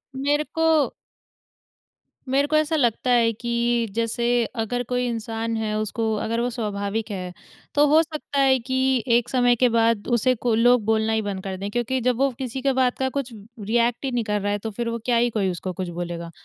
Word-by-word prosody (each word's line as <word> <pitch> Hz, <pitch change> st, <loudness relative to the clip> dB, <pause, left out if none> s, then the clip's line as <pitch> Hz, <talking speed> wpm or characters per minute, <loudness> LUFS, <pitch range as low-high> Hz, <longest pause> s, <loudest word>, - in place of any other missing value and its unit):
मेरे 290 Hz, +3 st, +1 dB
को 325 Hz, -3 st, +3 dB, 1.4 s
मेरे 275 Hz, +2 st, +2 dB
को 310 Hz, -, 0 dB
ऐसा 310 Hz, +1 st, +2 dB
लगता 250 Hz, -3 st, +1 dB
है 235 Hz, -2 st, +4 dB
कि 235 Hz, 0 st, 0 dB
जैसे 230 Hz, +2 st, -1 dB, 0.4 s
अगर 245 Hz, +3 st, -2 dB
कोई 250 Hz, 0 st, 0 dB
इंसान 230 Hz, 0 st, -3 dB
है 215 Hz, -1 st, -2 dB
उसको, 220 Hz, +1 st, -1 dB
अगर 225 Hz, +2 st, -2 dB
वो 245 Hz, -, 0 dB
स्वाभाविक 215 Hz, -1 st, -3 dB
है, 180 Hz, -2 st, -5 dB, 0.4 s
तो 290 Hz, +1 st, +5 dB
हो 310 Hz, +2 st, +6 dB
सकता 305 Hz, -3 st, -4 dB
है 265 Hz, -1 st, +4 dB
कि 260 Hz, 0 st, 0 dB
एक 240 Hz, 0 st, +2 dB
समय 245 Hz, -1 st, +3 dB
के 245 Hz, +1 st, +3 dB
बाद 230 Hz, -2 st, +1 dB
उसे 250 Hz, +1 st, +2 dB
को 235 Hz, +1 st, -1 dB
लोग 245 Hz, 0 st, +4 dB
बोलना 220 Hz, 0 st, +1 dB
ही 220 Hz, -, +1 dB
बंद 195 Hz, -2 st, -4 dB
कर 190 Hz, -1 st, -4 dB
दें 200 Hz, +2 st, -4 dB
क्योंकि 240 Hz, +3 st, -1 dB
जब 250 Hz, 0 st, +1 dB
वो 275 Hz, +2 st, +3 dB
किसी 260 Hz, 0 st, -4 dB
के 270 Hz, 0 st, +1 dB
बात 255 Hz, -1 st, +1 dB
का 265 Hz, 0 st, +1 dB
कुछ 260 Hz, -3 st, -4 dB, 0.3 s
रिएक्ट 235 Hz, +5 st, 0 dB
ही 265 Hz, -, -1 dB
नहीं 240 Hz, -2 st, 0 dB
कर 210 Hz, -1 st, -1 dB
रहा 205 Hz, +1 st, -1 dB
है 205 Hz, -, 0 dB
तो 220 Hz, -, -4 dB
फिर 235 Hz, +3 st, -3 dB
वो 230 Hz, 0 st, -3 dB
क्या 245 Hz, -2 st, +2 dB
ही 240 Hz, +1 st, +3 dB
कोई 205 Hz, -4 st, 0 dB
उसको 180 Hz, +1 st, -5 dB
कुछ 185 Hz, 0 st, -4 dB
बोलेगा? 170 Hz, -1 st, -5 dB
235 Hz, 210 wpm, -23 LUFS, 220-255 Hz, 1.4 s, हो